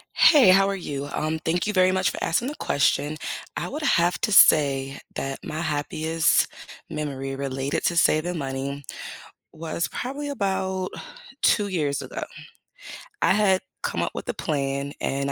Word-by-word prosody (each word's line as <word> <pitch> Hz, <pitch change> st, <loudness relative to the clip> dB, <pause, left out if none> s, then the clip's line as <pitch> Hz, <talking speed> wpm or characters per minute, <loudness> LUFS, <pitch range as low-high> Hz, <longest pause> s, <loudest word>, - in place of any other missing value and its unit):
Hey, 295 Hz, -, +7 dB
how 195 Hz, +1 st, +6 dB
are 200 Hz, -, -1 dB
you? 145 Hz, -6 st, -5 dB
Um, 155 Hz, +1 st, -1 dB
thank 165 Hz, +1 st, -1 dB
you 210 Hz, -, -1 dB
very 185 Hz, -1 st, +4 dB
much 190 Hz, +1 st, +1 dB
for -, -, -7 dB
asking 235 Hz, +11 st, 0 dB
the 300 Hz, -, -6 dB
question. 145 Hz, +1 st, 0 dB, 0.4 s
I -, -, -3 dB
would 305 Hz, -, -5 dB
have 175 Hz, -, +2 dB
to 215 Hz, -, 0 dB
say 140 Hz, -6 st, +5 dB, 0.2 s
that 135 Hz, 0 st, -4 dB
my 155 Hz, +1 st, -4 dB
happiest 160 Hz, +1 st, +1 dB, 0.4 s
memory 135 Hz, -3 st, -4 dB
related 135 Hz, 0 st, -2 dB
to 170 Hz, -, +1 dB
saving 170 Hz, +2 st, +2 dB
money 140 Hz, 0 st, -4 dB, 0.7 s
was 165 Hz, +1 st, -3 dB
probably 280 Hz, +3 st, -4 dB
about 190 Hz, -6 st, -2 dB, 0.5 s
2 205 Hz, -2 st, +3 dB
years 150 Hz, -7 st, -1 dB
ago. -, -, -6 dB, 1.0 s
I -, -, +4 dB
had 195 Hz, -3 st, +3 dB, 0.2 s
come -, -, -2 dB
up -, -, -2 dB
with -, -, -7 dB
a -, -, 0 dB
plan 140 Hz, -2 st, -2 dB
and 140 Hz, +1 st, -1 dB
160 Hz, 155 wpm, -24 LUFS, 140-190 Hz, 1.0 s, Hey